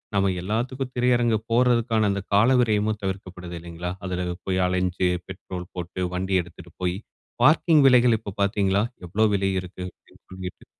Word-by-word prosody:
நம்ம 100 -1 +3
எல்லாத்துக்கும் 125 +6 -2
திரையரங்கு 120 -2 +3
போடுறதுக்கான 115 -3 +3
அந்த 100 0 -2
கால 105 +5 +5
விரயமும் 110 -2 +1
தவிர்க்கப்படுது 90 -2 -5
இல்லங்களா, 85 +1 -6
அதில 90 -1 -2 0.2
போய் 95 0 +1
அலைஞ்சு, 90 0 0 0.2
பெட்ரோல் 90 -1 -7
போட்டு 90 +1 -5
வண்டி 95 +1 -1
எடுத்துகிட்டு 85 0 -13
போய் 90 +1 0 0.5
பார்க்கிங் 155 -1 +5
விலைகள் 125 -3 +5
இப்போ 105 - -7
பாத்தீங்களா 100 0 +2 0.2
எவ்ளோ 105 +6 +2
விலை 95 0 +1
இருக்கு 90 0 -9
அப்பிடின்னு - - -25
சொல்லிட்டு? 95 -1 -8
95 Hz, 145 wpm, -24 LUFS, 90-115 Hz, 0.5 s, கால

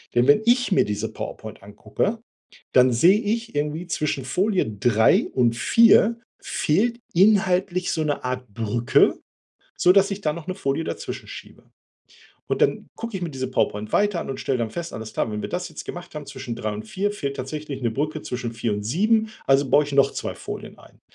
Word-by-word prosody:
Denn 120 +2 +4
wenn 145 +9 +6
ich 245 -2 +3
mir - - +4
diese 105 +2 -3
PowerPoint 110 0 -8
angucke, 105 - -3 0.6
dann 125 0 +5
sehe 175 - +5
ich 225 -1 -2
irgendwie 150 +4 -2
zwischen 150 -5 -2
Folie 190 - +1
3 110 +1 +3
und 120 -2 +2
4 230 - +5 0.2
fehlt 230 +10 0
inhaltlich 185 -1 +3
so 160 - -1
'ne 145 -1 -1
Art 125 0 -3
Brücke, 115 +1 +2 0.6
sodass 195 +3 +4
ich 200 - -5
dann 150 -2 -1
noch 170 - -9
'ne 185 - -3
Folie 160 -3 -2
dazwischen - - -6
schiebe. - - -11 0.8
Und - - -1
dann - - +1
gucke 230 -3 -5
ich 185 - -6
mir 170 - -3
diese 130 -2 -4
PowerPoint 105 -4 -1
weiter 205 -4 +2
an - - -6
und 135 - -4
stelle 130 - -1
dann 115 -2 -1
fest, 170 +4 -6
alles 110 0 -7
klar, - - -1
wenn 105 - -3
wir - - -4
das 180 0 -3
jetzt 155 - -8
gemacht 175 -1 -8
haben 150 -2 -7
zwischen 130 -3 -6
3 110 -3 -3
und 105 - -6
4 200 - -2
fehlt 140 -8 -4
tatsächlich 145 +1 -5
'ne 115 - +1
Brücke 150 +6 -2
zwischen 125 -2 -4
4 115 -1 -2
und 105 - -4
7. 215 - +2 0.2
Also 135 0 +3
baue 150 +1 +5
ich 145 - -7
noch 140 -1 +4
2 - - -4
Folien - - -8
ein. - - -19
150 Hz, 200 wpm, -23 LUFS, 120-190 Hz, 0.8 s, wenn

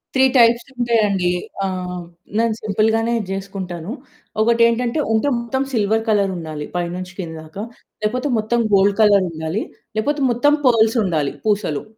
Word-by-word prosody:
3 265 - +5
types 235 0 +5
ఉంటాయండి. 210 -7 +1 0.3
ఆహ్, 180 -1 -4 0.3
నేను 230 -1 +2
సింపుల్ 215 +1 +1
గానే 225 +1 0 0.2
జేసుకుంటాను. 190 -2 -5 0.5
ఒకటేంటంటే 235 +4 +2
ఉంటె 220 +6 +2
మొత్తం 265 +3 -2
సిల్వర్ 220 0 +1
కలరుండాలి. 175 -8 -1
పై 175 0 0
నుంచి 185 0 -7
కింద 165 -3 -5
దాకా. 160 +6 -7 0.4
లేకపోతే 250 +6 -1
మొత్తం 235 +3 0
గోల్డ్ 200 +1 +4
కలరుండాలి. 185 -3 +2 0.3
లేకపోతే 285 +6 0
మొత్తం 290 +5 +3
పర్ల్స్ 225 -1 +4
ఉండాలి 155 -6 0
పూసలు. 200 -9 0
210 Hz, 130 wpm, -20 LUFS, 185-235 Hz, 0.5 s, 3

